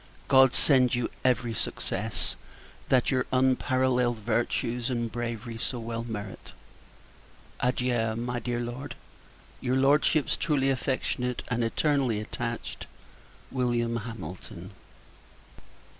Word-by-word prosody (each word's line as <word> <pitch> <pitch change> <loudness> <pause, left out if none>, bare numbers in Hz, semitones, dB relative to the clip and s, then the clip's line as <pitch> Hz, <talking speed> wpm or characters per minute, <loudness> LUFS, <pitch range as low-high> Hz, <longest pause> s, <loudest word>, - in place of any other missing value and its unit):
God 130 -2 +6
send 130 -4 +5
you 120 -1 -1
every 125 -2 +2
success, - - -2 0.5
that 130 0 +4
your 130 -1 +1
unparalleled 130 -1 +2
virtues 120 +2 0
and 120 -2 -1
bravery 115 -1 -4
so 125 - -1
well 115 0 -4
merit. 105 -4 -7 1.1
Adieu, 125 -3 +1
my 120 +1 -2
dear 120 +1 -2
Lord! 120 +4 -5 0.6
Your 130 0 0
Lordship's 145 +2 +3
truly 135 -3 +1
affectionate, 130 -2 -1
and 120 -1 +1
eternally 130 -1 +1
attached, 115 +2 -4 0.7
Wm. 120 -2 +1
HAMILTON. 105 -7 -7
120 Hz, 100 wpm, -28 LUFS, 115-130 Hz, 1.1 s, God